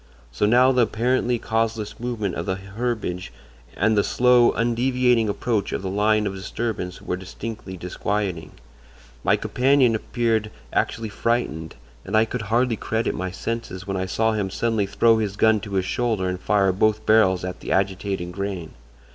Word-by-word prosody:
So 105 Hz, +11 st, +1 dB
now 125 Hz, +4 st, +5 dB
the 125 Hz, -1 st, +3 dB
apparently 120 Hz, +2 st, +1 dB
causeless 110 Hz, -1 st, -2 dB
movement 115 Hz, -6 st, -2 dB
of 85 Hz, -, -4 dB
the 95 Hz, -, 0 dB
herbage 100 Hz, -2 st, -4 dB, 0.5 s
and 110 Hz, +4 st, +3 dB
the 100 Hz, -, +3 dB
slow, 125 Hz, -1 st, +4 dB
undeviating 120 Hz, -1 st, +2 dB
approach 105 Hz, -1 st, -1 dB
of -, -, -3 dB
the 95 Hz, -, -3 dB
line 105 Hz, +1 st, +2 dB
of 100 Hz, -, -2 dB
disturbance 95 Hz, -1 st, -4 dB
were -, -, -2 dB
distinctly 95 Hz, +1 st, -7 dB
disquieting. 90 Hz, 0 st, -3 dB, 0.7 s
My -, -, +4 dB
companion 130 Hz, -1 st, +3 dB
appeared 110 Hz, -1 st, 0 dB, 0.2 s
actually 115 Hz, -1 st, -1 dB
frightened, 100 Hz, -8 st, -2 dB, 0.3 s
and 105 Hz, +3 st, 0 dB
I 110 Hz, -, +5 dB
could 120 Hz, +1 st, -4 dB
hardly 115 Hz, +3 st, +1 dB
credit 110 Hz, +1 st, -1 dB
my 95 Hz, +1 st, -3 dB
senses 100 Hz, -1 st, -5 dB
when 95 Hz, -1 st, -3 dB
I 95 Hz, 0 st, -2 dB
saw 110 Hz, +4 st, +1 dB
him 105 Hz, -3 st, -1 dB
suddenly 110 Hz, 0 st, 0 dB
throw 115 Hz, +3 st, +3 dB
his 105 Hz, -2 st, -2 dB
gun 110 Hz, 0 st, +4 dB
to 100 Hz, 0 st, -8 dB
his 95 Hz, -1 st, +1 dB
shoulder 110 Hz, -3 st, 0 dB
and 90 Hz, 0 st, -2 dB
fire 100 Hz, 0 st, +2 dB
both 105 Hz, +3 st, +1 dB
barrels 95 Hz, -5 st, +4 dB
at 90 Hz, 0 st, -5 dB
the -, -, -6 dB
agitated 95 Hz, -2 st, -1 dB
grain! 95 Hz, -3 st, -4 dB
105 Hz, 165 wpm, -23 LUFS, 95-115 Hz, 0.7 s, now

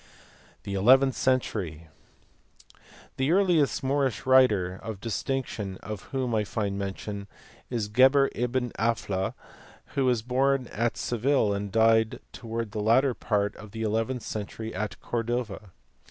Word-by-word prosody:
The 100 Hz, -, -5 dB
eleventh 130 Hz, +7 st, +5 dB
century. 95 Hz, -11 st, -1 dB, 1.3 s
The 135 Hz, +3 st, +1 dB
earliest 175 Hz, -8 st, +3 dB
Moorish 135 Hz, -3 st, 0 dB
writer 105 Hz, -9 st, +4 dB
of 110 Hz, -3 st, -6 dB
dis 115 Hz, 0 st, -3 dB
tinction 110 Hz, -8 st, -3 dB
of 105 Hz, -2 st, -8 dB
whom 130 Hz, -3 st, -2 dB
I 110 Hz, -1 st, +2 dB
find 100 Hz, -1 st, -2 dB
mention 100 Hz, +1 st, -5 dB, 0.4 s
is 115 Hz, -4 st, -2 dB
G 110 Hz, +5 st, +1 dB
eber 135 Hz, +1 st, +6 dB
ibn 125 Hz, 0 st, -1 dB
Aphla, 105 Hz, -4 st, -1 dB, 0.6 s
who 135 Hz, -, +1 dB
was 120 Hz, -4 st, +2 dB
born 130 Hz, +2 st, +1 dB
at 115 Hz, +2 st, 0 dB
Seville 120 Hz, -2 st, +1 dB
and 100 Hz, 0 st, -3 dB
died 110 Hz, 0 st, +3 dB
towards 115 Hz, -2 st, -5 dB
the 105 Hz, -, -3 dB
latter 125 Hz, +5 st, +4 dB
part 105 Hz, -2 st, -1 dB
of 105 Hz, -2 st, -12 dB
the 110 Hz, 0 st, -4 dB
eleventh 115 Hz, +3 st, -1 dB
century 110 Hz, +1 st, -5 dB
at 105 Hz, +2 st, -4 dB
Cordova. 115 Hz, -3 st, -3 dB
115 Hz, 140 wpm, -27 LUFS, 105-130 Hz, 1.3 s, eber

